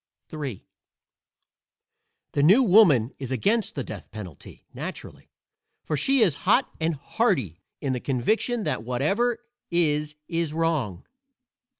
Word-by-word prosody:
III 140 Hz, -, -5 dB, 1.7 s
The 145 Hz, -, 0 dB
New 195 Hz, -, +6 dB
Woman 175 Hz, -, +5 dB
is 130 Hz, -2 st, -5 dB
against 205 Hz, -, 0 dB
the 140 Hz, -, -2 dB
death 105 Hz, -5 st, -9 dB
penalty, 95 Hz, -9 st, -10 dB
naturally, -, -, -8 dB, 0.5 s
for 155 Hz, -, -2 dB
she 265 Hz, -, +2 dB
is 190 Hz, -9 st, +5 dB, 0.2 s
hot 250 Hz, +5 st, +4 dB
and 160 Hz, 0 st, 0 dB
hardy 140 Hz, -, -1 dB, 0.2 s
in 135 Hz, -3 st, -1 dB
the 125 Hz, -, -2 dB
conviction 215 Hz, -, 0 dB
that -, -, -1 dB
whatever 200 Hz, -, 0 dB, 0.2 s
is 150 Hz, -3 st, 0 dB
is 165 Hz, -3 st, -1 dB
wrong. 155 Hz, -, -1 dB
150 Hz, 120 wpm, -25 LUFS, 125-205 Hz, 1.7 s, New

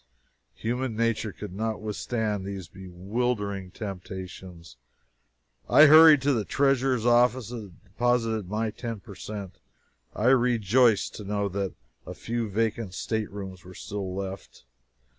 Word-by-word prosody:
Human 120 Hz, +1 st, -2 dB
nature 115 Hz, -1 st, 0 dB
could 100 Hz, -1 st, -8 dB
not 110 Hz, +2 st, -2 dB
withstand 110 Hz, -1 st, -2 dB
these 95 Hz, -3 st, -6 dB
bewildering 100 Hz, +2 st, -3 dB
temptations. 90 Hz, -, -8 dB, 0.9 s
I 150 Hz, -, +8 dB
hurried 155 Hz, -2 st, +8 dB
to 140 Hz, 0 st, +3 dB
the 110 Hz, -4 st, 0 dB
treasurer's 135 Hz, -2 st, +1 dB
office 120 Hz, 0 st, +3 dB
and 105 Hz, -7 st, -9 dB
deposited 115 Hz, -1 st, 0 dB
my 110 Hz, +1 st, -1 dB
ten 115 Hz, -1 st, -6 dB
percent. 100 Hz, -1 st, -8 dB, 0.6 s
I 115 Hz, +4 st, +2 dB
rejoiced 120 Hz, -3 st, +3 dB
to 105 Hz, -, -7 dB
know 100 Hz, 0 st, -1 dB
that 100 Hz, 0 st, -3 dB, 0.3 s
a -, -, -7 dB
few 115 Hz, -1 st, -3 dB
vacant 110 Hz, -1 st, -1 dB
staterooms 100 Hz, -5 st, -4 dB
were 90 Hz, +1 st, -12 dB
still 95 Hz, -2 st, -5 dB
left. 95 Hz, -8 st, -7 dB
105 Hz, 120 wpm, -27 LUFS, 95-120 Hz, 0.9 s, I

